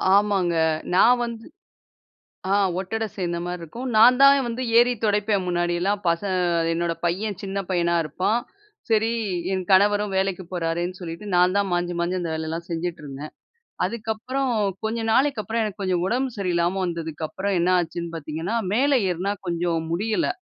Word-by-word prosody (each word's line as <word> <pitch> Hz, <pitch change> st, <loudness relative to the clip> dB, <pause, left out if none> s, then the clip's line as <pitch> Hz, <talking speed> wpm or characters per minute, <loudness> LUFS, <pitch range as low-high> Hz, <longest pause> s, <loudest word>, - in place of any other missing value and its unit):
ஆமாங்க. 200 Hz, -4 st, +2 dB, 0.4 s
நான் 245 Hz, +6 st, +6 dB
வந்து 230 Hz, -1 st, -6 dB, 1.1 s
ஆ -, -, +4 dB, 0.2 s
ஒட்டட 225 Hz, +4 st, -3 dB
சேர்ந்த 175 Hz, -3 st, -2 dB
மாரி 180 Hz, 0 st, -4 dB
இருக்கும். 235 Hz, +11 st, -7 dB
நான் 245 Hz, +3 st, +7 dB
தான் 275 Hz, 0 st, +8 dB
வந்து 235 Hz, +2 st, -4 dB, 0.2 s
ஏறி 245 Hz, +1 st, +4 dB
துடைப்பேன் 205 Hz, -2 st, +1 dB
முன்னாடியெல்லாம் 175 Hz, +3 st, 0 dB
பசங் 185 Hz, +3 st, 0 dB, 0.4 s
என்னோட 170 Hz, 0 st, -1 dB
பையன் 195 Hz, +3 st, -1 dB
சின்ன 195 Hz, 0 st, -3 dB
பையனா 170 Hz, -1 st, +1 dB
இருப்பான். 185 Hz, -, 0 dB, 0.5 s
சரி, 220 Hz, 0 st, +3 dB, 0.4 s
என் 185 Hz, -1 st, -1 dB
கணவரும் 205 Hz, +1 st, +4 dB
வேலைக்கு 190 Hz, -1 st, -1 dB
போறார்ன்னு 175 Hz, +1 st, -2 dB
சொல்லிட்டு 170 Hz, +2 st, -7 dB
நான் 180 Hz, +2 st, +4 dB
தான் 200 Hz, -1 st, +1 dB
மாஞ்சி 175 Hz, 0 st, 0 dB
மாஞ்சி 175 Hz, +2 st, 0 dB
அந்த 170 Hz, -, -3 dB
வேலையெல்லாம் 160 Hz, +2 st, -4 dB
செஞ்சுட்ருந்தேன். 155 Hz, -4 st, -5 dB, 0.5 s
அதுக்கப்புறம் 235 Hz, +6 st, -2 dB, 0.3 s
கொஞ்ச 220 Hz, +2 st, -1 dB
நாளைக்கப்புறம் 230 Hz, -4 st, +1 dB
எனக்கு 210 Hz, -1 st, -4 dB
கொஞ்சம் 185 Hz, -2 st, 0 dB
உடம்பு 255 Hz, +5 st, 0 dB
சரியில்லாம 180 Hz, 0 st, 0 dB
வந்ததுக்கப்புறம் 165 Hz, +3 st, -3 dB
என்ன 175 Hz, +2 st, +2 dB
ஆச்சுன்னு 170 Hz, 0 st, -3 dB
பார்த்தீங்கன்னா, 160 Hz, +7 st, -4 dB, 0.2 s
மேல 275 Hz, +6 st, +2 dB, 0.2 s
ஏறினா 180 Hz, +3 st, -1 dB, 0.2 s
கொஞ்சம் 170 Hz, -1 st, 0 dB
முடியல 215 Hz, -, 0 dB
185 Hz, 140 wpm, -24 LUFS, 170-215 Hz, 1.1 s, தான்